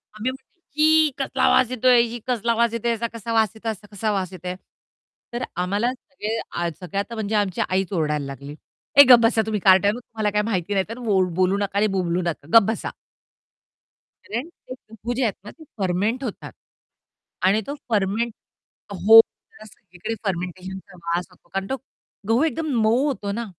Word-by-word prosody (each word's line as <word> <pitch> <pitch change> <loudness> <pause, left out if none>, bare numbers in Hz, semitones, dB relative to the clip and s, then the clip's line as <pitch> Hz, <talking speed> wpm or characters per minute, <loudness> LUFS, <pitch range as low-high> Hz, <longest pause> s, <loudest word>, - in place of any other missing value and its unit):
आम्ही 230 +4 -2
म्हटलं 265 +6 -16
छी! 310 0 +4
कसला 265 -1 -1
आवाज 250 -1 +4
येतोय 250 0 +5
छी! 240 +1 -6
कसला 235 -2 +1
वास 235 0 +2
येतोय 235 +1 -1
याचा, 230 0 -1
कसा 230 0 -5
वास 220 -2 +3
येतोय? 220 0 -3
असा 210 0 -11
कसा 210 +1 -1
वास 190 -3 -1
येतोय? 180 0 -5 0.8
तर 240 +1 -3 0.2
आम्हाला 205 +7 0
सगळे 230 -4 -5 0.2
अ, 175 0 0
सगळे 185 +2 -7
आता 230 +3 -4
म्हणजे 220 -1 -2
आमची 200 -3 0
आईच 190 +1 -1
ओरडायला 150 -4 0
लागली, 140 +1 -8 0.4
"ए 285 - +12
गप 245 -2 +10
बसा 225 -1 +3
तुम्ही 215 -1 -1
कारट्यांनो 200 +4 +5
तुम्हाला 220 -3 -3
काही 210 0 0
माहिती 200 -3 -1
नाही 190 -1 +1
तर 230 - -6
वो 200 -4 +3
बोलू 185 +1 +2
नका 200 0 -2
आणि 210 +1 +3
बोंबलू 175 -1 0
नका, 170 -5 -4
गप 225 - +7
बसा." 225 - -2 1.4
कारण 245 +10 -4
ते 255 - -12 0.2
गहू 225 +2 -5
जे 255 +2 -1
आहेत 220 -4 +1
ना 210 - -8
ते 320 - -16
फर्मेंट 205 +6 0
होतात 230 -6 -6 0.9
आणि 200 +4 +3
तो 285 - -4
फर्मेंट 215 +2 0 0.6
हो, 220 +4 +8
त्याला 215 -1 -19
सगळीकडे 215 -1 -8
फर्मेंटेशनचा 185 +1 -5
वास 175 +1 -1
होतो 175 - -24
कारण 195 0 -2
तो 265 - -1 0.5
गहू 235 +6 +3
एकदम 320 0 -1
मऊ 230 +6 +3
होतो 210 -8 -3
ना. 235 +3 -3
215 Hz, 185 wpm, -23 LUFS, 190-235 Hz, 1.4 s, ए